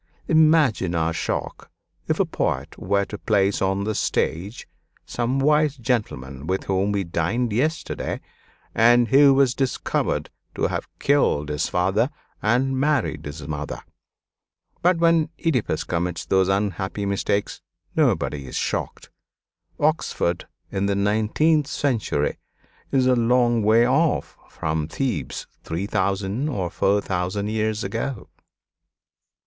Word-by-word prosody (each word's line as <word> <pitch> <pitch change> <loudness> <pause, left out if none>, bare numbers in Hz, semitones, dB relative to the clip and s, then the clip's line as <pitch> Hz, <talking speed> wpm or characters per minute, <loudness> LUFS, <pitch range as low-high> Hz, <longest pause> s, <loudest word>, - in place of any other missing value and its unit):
Imagine 155 - +3
our 80 0 +1
shock - - -4 0.4
if - - 0
a - - +4
poet - - -2
were 100 +2 +1
to 105 - -8
place 100 -2 +1
on 95 +1 +1
the 110 +1 -1
stage 100 +2 -2 0.4
some 120 +2 -1
wise 150 +1 +3
gentleman 80 - -3
with 95 +1 -1
whom 95 +1 0
we 100 -1 0
dined 95 +8 -1
yesterday, 150 +8 -1 0.5
and 120 0 +5
who 140 +3 +7
was 135 -2 +4
discovered 130 -1 -1 0.2
to - - 0
have - - -3
killed 105 - +2
his 75 0 -1
father 95 +8 +1 0.3
and 130 +4 +1
married 145 -3 0
his 75 0 -7
mother. 75 -1 -4 1.0
But 180 0 +3
when 165 -2 +3
Oedipus 140 -9 0
commits 85 0 -2
those 95 -1 +2
unhappy 100 0 -1
mistakes 100 +1 -1 0.3
nobody 70 -3 +1
is - - -8
shocked. - - -3 0.7
Oxford 145 - 0 0.2
in 95 +1 0
the 100 - +1
nineteenth 110 +10 +2
century 120 - -1 0.5
is 130 -2 +3
a 130 0 +4
long 120 0 +3
way 110 +3 +5
off 155 +5 +1
from 80 -1 -2
Thebes 95 - -3 0.2
three 85 +4 -3
thousand 100 +6 -1
or 95 - -2
four 100 +1 +2
thousand 95 +3 -2
years 110 0 -1
ago. 115 +2 -4
105 Hz, 125 wpm, -23 LUFS, 95-130 Hz, 1.0 s, who